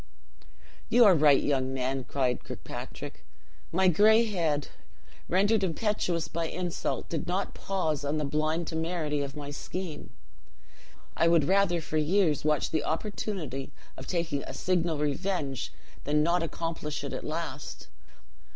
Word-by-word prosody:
"You 235 +1 +7
are 200 - +8
right, 150 -4 +5
young 135 -2 0
man," 130 0 -1
cried 125 -1 0
Kirkpatrick; - - -8 0.5
"my 190 +2 +3
gray 215 +6 +6
head, 165 -9 0 0.6
rendered 200 +3 +3
impetuous 180 -2 0
by 170 0 -2
insult, 175 0 -3
did 165 - -3
not 185 +3 -1
pause 160 -7 -1
on 145 +2 0
the 150 - 0
blind 155 +4 0
temerity 160 -3 -1
of 140 0 -4
my 145 -1 -6
scheme. 175 +3 -5 1.1
I 165 - +3
would 165 -2 +5
rather 190 -2 +3
for 155 - -2
years 155 -1 +2
watch 150 0 +1
the 155 -2 +1
opportunity 160 - -3 0.2
of 130 - -9
taking 170 -5 -1
a - - -7
signal 170 -3 +1
revenge 145 - -1 0.3
than 150 +1 +3
not 170 +2 +2
accomplish 165 -3 -3
it 140 - -4
at - - -4
last. 155 -3 -5
160 Hz, 140 wpm, -29 LUFS, 145-180 Hz, 1.1 s, are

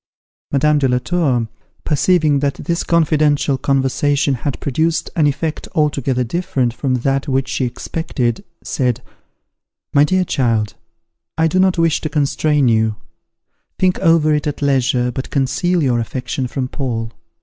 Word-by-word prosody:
Madame 150 +2 +3
de 135 - +2
la 125 -1 +2
Tour, 130 -6 0 0.4
perceiving 155 -1 +2
that 140 0 0
this 170 -1 -2
confidential 155 -4 +2
conversation 140 +2 +1
had 135 +2 -3
produced 160 +4 -1
an 155 -3 +3
effect 155 +2 -2
altogether 140 -4 +1
different 130 -3 -1
from 130 +1 -1
that 135 +3 -1
which 135 -1 0
she 130 - -1
expected, 125 -2 -3 0.2
said, 125 -1 -1 0.9
"My 140 - +6
dear 185 +4 +2
child, 115 - 0 0.6
I 160 - +3
do 185 +4 +1
not 185 -1 +3
wish 165 -2 +2
to 155 - -3
constrain 150 -1 +1
you; 110 -2 +2 0.8
think 185 -1 +1
over 165 -4 +3
it 150 0 0
at 145 0 -3
leisure, 130 -2 +1
but 130 +2 -5
conceal 175 +5 0
your 125 -3 +2
affection 125 +2 -3
from 130 +1 -3
Paul. 115 -4 -4
140 Hz, 145 wpm, -18 LUFS, 125-155 Hz, 0.9 s, My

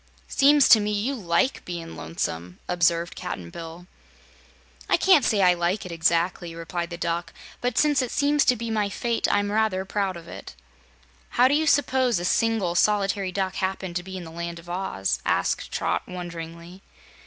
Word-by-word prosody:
"Seems 285 -1 +5
to 220 - +9
me 210 0 -1
you 210 +6 -1
LIKE 210 +3 0
bein' 170 -2 -6
lonesome," 90 - -4
observed 170 -1 +1
Cap'n 85 -2 -6
Bill. 165 +1 -9 1.0
"I - - +4
can't 370 -8 +5
say 205 -3 +2
I 180 -1 +6
like 175 +4 -1
it, 180 - -7
exactly," 170 +1 0
replied 170 +1 -4
the 170 - -6
Duck, 170 0 -2 0.3
"but 245 -1 -1
since 295 -3 +3
it 250 - -2
seems 290 +2 +2
to 250 - +4
be 230 0 -4
my 210 -2 0
fate, 235 +4 -1
I'm 205 0 +1
rather 210 -3 +1
proud 195 -2 -2
of 170 0 -12
it." - - -10 0.8
"How 250 +1 +7
do 270 - +1
you 310 +2 +2
s'pose 260 -6 +3
a 175 - -3
single, 220 -3 +1
solitary 195 0 +1
Duck 190 0 -2
happened 190 -2 -3
to 180 - 0
be 190 +1 -8
in 180 - -7
the 165 - -10
Land 170 +1 -5
of 170 +1 -10
Oz?" 175 - -2
asked - - 0
Trot, - - -1
wonderingly. 170 0 -8
185 Hz, 180 wpm, -25 LUFS, 170-220 Hz, 1.0 s, to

